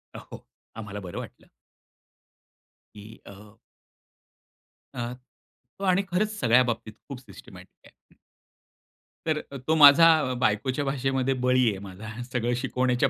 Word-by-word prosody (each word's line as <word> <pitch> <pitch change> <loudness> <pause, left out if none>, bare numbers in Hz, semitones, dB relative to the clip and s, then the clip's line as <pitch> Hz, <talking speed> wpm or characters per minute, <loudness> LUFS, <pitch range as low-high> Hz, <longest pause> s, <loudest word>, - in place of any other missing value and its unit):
अ, - - -6 0.2
हो. - - -11 0.3
आम्हाला 105 -2 -7
बरं 90 -3 -8
वाटलं. - - -11 1.5
की 105 +1 -13
अ 105 +2 -14 1.4
अ, 120 0 -4 0.7
तो - - -7
आणि 185 +1 +2
खरंच 210 +4 -1
सगळ्या 125 0 +4
बाबतीत 115 -3 -4
खूप 140 -3 -8
सिस्टमॅटिक 100 -7 -15
आहे. - - -24 1.1
तर 155 -1 +1
अ, 140 - -6
तो 160 - +3
माझा 150 +2 +8 0.3
बायकोच्या 125 +5 0
भाषेमध्ये 135 -1 -1
बळी 125 -1 +3
आहे 100 -3 -5
माझा. 110 +4 -9
सगळं 120 -1 -2
शिकवण्याच्या 125 0 0
125 Hz, 125 wpm, -26 LUFS, 110-140 Hz, 1.5 s, माझा